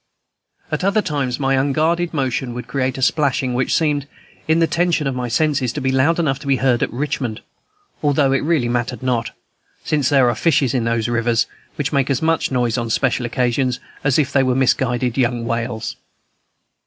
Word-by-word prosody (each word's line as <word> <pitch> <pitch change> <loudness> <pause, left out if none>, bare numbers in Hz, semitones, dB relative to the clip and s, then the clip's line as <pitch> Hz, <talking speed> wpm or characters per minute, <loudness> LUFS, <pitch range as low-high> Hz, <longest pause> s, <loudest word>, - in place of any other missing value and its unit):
At - - -2
other 200 +2 +2
times, 140 -6 -1
some 140 - -4
unguarded 155 +6 +1
motion 130 -4 -2
would 125 - -5
create 130 -1 -1
a 130 - -2
splashing 135 -2 +1
which 125 +1 +1
seemed, 145 -3 0 0.4
in 160 +1 +3
the 165 - +4
tension 170 -2 +1
of 135 - 0
my 125 -1 -3
senses, 135 0 +1
to - - -3
be 130 -1 0
loud 135 +6 +2
enough 140 -6 0
to 145 - -10
be 135 - +3
heard 125 -1 +1
at - - 0
Richmond, 130 -4 -3 0.6
although 145 -2 +2
it 135 - +2
really 150 -5 +1
mattered 120 0 -2
not, 120 -3 0 0.5
since 145 -4 +1
there 135 -4 +4
are 120 - +2
fishes 140 -1 +2
in 125 -3 0
those 115 -1 0
rivers 120 0 +1 0.3
which 145 0 -2
make 140 -1 +1
as 135 -2 +1
much 165 0 +1
noise 125 -2 0
on 115 -1 -3
special 125 +1 0
occasions 125 +1 0 0.2
as 135 -2 +2
if 140 -3 +1
they 135 - +4
were 130 -1 +1
misguided 125 -1 +1
young 120 -2 0
whales. 115 -1 -3
130 Hz, 190 wpm, -19 LUFS, 120-145 Hz, 0.6 s, the